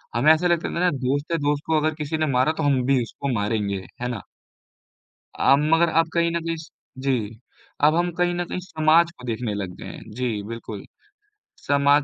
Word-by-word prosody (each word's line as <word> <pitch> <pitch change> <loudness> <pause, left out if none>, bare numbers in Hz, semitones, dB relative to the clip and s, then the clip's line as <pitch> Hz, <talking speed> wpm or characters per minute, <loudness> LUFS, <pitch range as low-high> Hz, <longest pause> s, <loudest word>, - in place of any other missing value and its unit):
हमें 150 +7 +6
ऐसा 165 +3 +1
लगता 170 -1 +1
था - - -1
ना 180 0 +4
दोस्त 140 +3 -2
है, 165 - +2
दोस्त 145 0 0
को 160 -1 +3
अगर 155 +1 +1
किसी 155 0 -3
ने 155 - +1
मारा 130 +4 +3
तो 160 - -1
हम 135 -3 +2
भी 135 -2 +3
उसको 135 +3 -4
मारेंगे। 105 -3 -1 0.2
है 125 - -1
ना? 115 -6 -4 1.2
अ, 135 - +5
मगर 165 +3 +3
अब 165 - -1
कहीं 170 0 +2
न 170 0 -1
कहीं 165 0 -1
स 160 +1 -11 0.3
जी, 135 - +3 0.7
अब 155 +1 +5
हम 175 0 +1
कहीं 175 0 +2
न 175 0 -1
कहीं 180 - -4
समाज 165 -1 +3
को 125 - -12
देखने 115 -2 -2
लग 95 -3 -4
गए - - -8
हैं। - - -11
जी, 115 -2 -2
बिल्कुल। 115 -3 -7 0.8
समाज 140 0 +4
145 Hz, 210 wpm, -23 LUFS, 125-165 Hz, 1.2 s, हमें